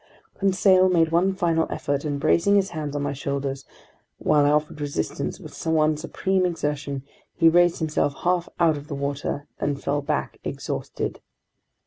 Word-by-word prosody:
Conseil 190 -1 +4
made 165 -3 +3
one 185 +3 +2
final 165 -4 +1
effort, 140 0 -2
and 145 -1 -2
bracing 200 +7 +3
his 195 -1 +2
hands 150 -3 -4
on 145 - -1
my 145 0 -1
shoulders, 140 0 -3 0.5
while 150 -1 +3
I - - +4
offered 150 0 0
resistance 140 - -3
with - - -10
one 155 -1 +3
supreme 185 +4 -1
exertion, 150 -5 -2 0.3
he 165 - +4
raised 175 +1 +5
himself 150 -3 0
half 175 -1 +1
out 165 -3 +4
of 145 +1 -9
the 145 - -4
water, 140 +1 -3
then 145 - 0
fell 145 +1 -1
back 145 +1 -2
exhausted. - - -4
155 Hz, 160 wpm, -24 LUFS, 145-175 Hz, 0.5 s, raised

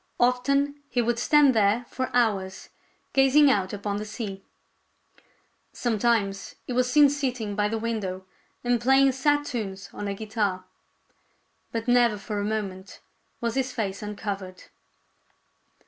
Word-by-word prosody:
Often 275 +4 +1
he 245 - -1
would 235 0 +1
stand 290 +1 +5
there 215 +2 +2
for 260 -1 -3
hours, 200 -6 0 0.4
gazing 270 +1 +5
out 190 -5 0
upon 200 0 -3
the 210 - -4
sea. 205 -3 -6 1.3
Sometimes 220 -4 0
he 250 - -4
was 250 0 +1
seen 295 0 +7
sitting 255 -7 -2
by 205 0 +1
the 225 +2 -2
window 210 -5 -3 0.4
and 245 -1 +1
playing 270 +2 +5
sad 290 +3 +1
tunes 195 -7 -5
on 205 - -5
a 200 - -2
guitar. 205 -3 -2 1.1
But 230 0 -4
never 240 -3 +4
for 205 +1 -4
a - - -1
moment 200 -3 -4 0.4
was 235 -1 -1
his 260 0 -1
face 200 -4 -3
uncovered. 200 -3 -5
225 Hz, 135 wpm, -26 LUFS, 200-250 Hz, 1.3 s, seen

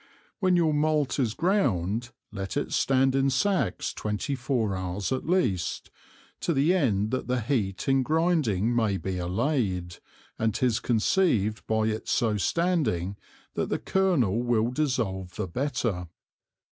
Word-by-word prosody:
When 185 -3 +3
your 165 -3 +3
Malt 150 -2 +1
is 115 -4 0
ground, 120 - 0 0.2
let 95 -2 -4
it - - -2
stand 135 0 +3
in 135 0 +2
Sacks 140 - 0
twenty 105 +6 -3
four 120 -6 -1
Hours 95 +3 -3
at 130 +2 -2
least, 125 - 0 0.5
to 170 - 0
the 145 +6 +3
end 110 - +1
that 130 - -2
the 125 0 0
Heat 105 -7 -1
in 135 0 +3
grinding 140 - +1
may 110 -4 +1
be 95 -1 -3
allayed, 95 - -1 0.4
and 110 -1 0
'tis 120 -3 +1
conceived 110 - +1
by 110 0 +1
its 110 0 -2
so 115 -4 +2
standing 140 - 0 0.4
that - - -2
the - - 0
Kernel 145 - +1
will 120 -1 +1
dissolve 115 - -2
the - - -3
better. 115 - -2
120 Hz, 145 wpm, -27 LUFS, 100-145 Hz, 0.5 s, When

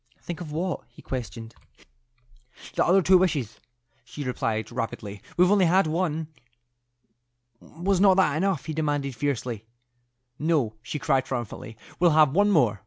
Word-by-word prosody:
"Think 175 0 -7
of 155 -4 -7
what?" 170 +3 -2
he 120 - -17
questioned. 115 -2 -6 1.2
"The - - +2
other 190 +2 +4
two 185 +2 +6
wishes," 140 - -1 0.4
she 135 +4 -7
replied, 115 -4 -2
rapidly. 110 -4 -5 0.2
"We've 180 +2 +5
only 200 -3 +5
had 185 +3 +4
one." 160 -1 -1 1.3
"Was 185 +6 -1
not 195 -2 +6
that 180 -7 +3
enough?" 170 -4 0
he 155 - -4
demanded, 145 -4 -1
fiercely. 125 -5 -2 0.8
"No," 150 -8 +1
she 115 +6 -5
cried, 135 -3 +1
triumphantly; 120 -3 -5 0.2
"we'll 170 -3 +4
have 150 -3 +5
one 205 +4 +4
more. 120 - +3
150 Hz, 145 wpm, -26 LUFS, 120-175 Hz, 1.3 s, two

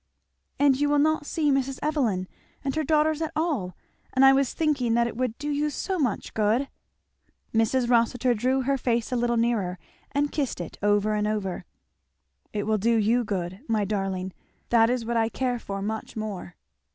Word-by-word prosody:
"And 275 -2 +4
you 290 - +3
will 295 - +3
not 305 0 +2
see 300 -3 +1
Mrs. 270 -1 0
Evelyn 240 -12 0 0.4
and 275 +1 -2
her 315 - 0
daughters 310 +1 +2
at 320 - -2
all! 280 - -1 0.4
and 265 +1 +5
I 270 - +8
was 275 -1 +2
thinking 275 -8 +1
that 235 0 +3
it 235 - -4
would 245 -2 -2
do 295 0 -3
you 295 +1 0
so 375 +5 -3
much 250 -9 -1
good! 220 +6 +1 0.4
" - - -44
Mrs. 225 +3 +2
Rossitur 245 +1 +3
drew 255 +4 +1
her 275 +1 0
face 235 -1 0
a - - 0
little 240 0 +1
nearer 220 -6 0 0.3
and 285 +1 0
kissed 280 -9 -2
it, 175 - -6
over 205 +1 +2
and 210 0 0
over. 205 -4 -2 0.9
"It 205 -1 -2
will 215 0 +1
do 230 +3 +2
you 225 +3 +2
good, 185 -3 -3
my 215 -3 +1
darling 190 -2 -2 0.4
that 230 -1 +5
is 245 -2 -1
what 235 +1 -1
I 225 0 +2
care 250 0 -1
for 195 -3 -5
much 220 +1 -4
more." 205 -5 -5
235 Hz, 190 wpm, -26 LUFS, 210-275 Hz, 0.9 s, I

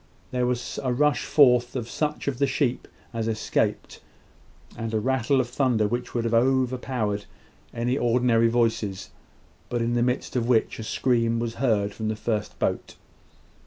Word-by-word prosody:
There 125 -1 0
was 125 -1 -3
a 130 - -1
rush 150 +4 +2
forth 125 -4 +4
of 120 -3 -3
such 150 +3 -3
of 135 -3 -1
the 140 - +3
sheep 135 -2 -1 0.3
as 115 -1 -2
escaped, 110 -1 -1 0.7
and 115 -1 -4
a - - +2
rattle 130 +3 +1
of 125 - 0
thunder 120 -4 +1
which 120 +3 -4
would 120 - 0
have 115 0 -1
overpowered 125 -4 +1 0.5
any 120 +3 -1
ordinary 120 -1 +3
voices, 115 -4 0 0.6
but 120 - -1
in 120 +1 0
the 120 - +1
midst 125 +2 -1
of 120 -2 0
which 115 -2 +2
a - - -4
scream 115 0 +1
was 115 0 -2
heard 105 -6 +1
from 110 +1 -4
the 110 - -1
first 110 -1 -3
boat. - - -2
120 Hz, 165 wpm, -25 LUFS, 115-130 Hz, 0.7 s, forth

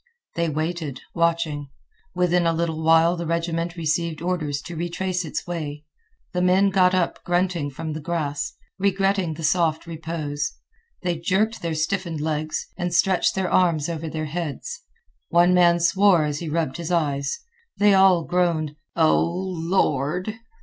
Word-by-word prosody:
They 170 -1 0
waited, 155 -2 -3
watching. 165 -4 0 0.5
Within 180 -1 +2
a 165 - +2
little 165 -1 -1
while 165 +2 +5
the 170 -1 -4
regiment 170 +1 -1
received 165 -1 -1
orders 160 -5 -1
to 175 - -7
retrace 180 +2 -2
its 155 - -4
way. 155 -4 -5 0.5
The 180 - 0
men 190 +2 +4
got 185 -1 +4
up 180 -2 -1
grunting 175 -4 0
from 155 +3 -5
the 155 - -4
grass, 150 -3 -2 0.3
regretting 195 -3 +1
the 165 - -8
soft 160 0 +1
repose. 160 -3 -4 0.5
They 175 -3 -1
jerked 205 +6 0
their 165 -2 -2
stiffened 165 0 -1
legs, 155 0 -2
and 175 -1 -2
stretched 180 +2 +2
their 190 -1 -1
arms 170 -4 +2
over 165 -1 -4
their 155 0 -3
heads. 175 - -5 0.5
One 175 +1 +5
man 175 -1 +5
swore 180 -1 +4
as 145 -1 -2
he 170 - -5
rubbed 160 -3 -1
his 170 0 -4
eyes. 145 - 0 0.4
They 205 0 +5
all 190 -3 +5
groaned 165 -4 0 0.2
"O 160 -2 +4
Lord!" 175 -1 -1
170 Hz, 150 wpm, -23 LUFS, 155-180 Hz, 0.5 s, while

